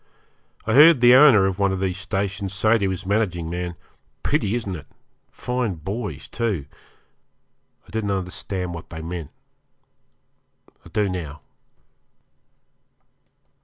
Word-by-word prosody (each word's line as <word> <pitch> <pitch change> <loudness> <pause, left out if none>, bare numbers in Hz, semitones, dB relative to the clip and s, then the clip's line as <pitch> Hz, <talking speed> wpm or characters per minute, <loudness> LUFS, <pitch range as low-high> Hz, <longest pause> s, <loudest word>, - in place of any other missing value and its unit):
I - - 0
heard 150 +1 +8
the 120 +1 +7
owner 130 -7 +7
of 95 0 -1
one 100 -1 +2
of 95 - -2
these 95 0 -2
stations 100 0 -3
say 110 +3 +3
to 100 -1 0
his 95 0 -4
managing 90 -5 -1
man, 90 0 -4 0.5
'Pity, 105 +3 0
isn't 105 -6 -3
it? 75 - -10 0.4
fine 125 -6 -2
boys, 100 +8 -5
too.' 105 - -2 1.2
I - - -16
didn't 110 -2 -2
understand 90 -1 -3
what 85 - -9
they 80 -1 -7
meant. 85 -3 -5 1.5
I - - -14
do 105 -1 0
now. 80 -6 -5
95 Hz, 130 wpm, -23 LUFS, 90-110 Hz, 1.5 s, heard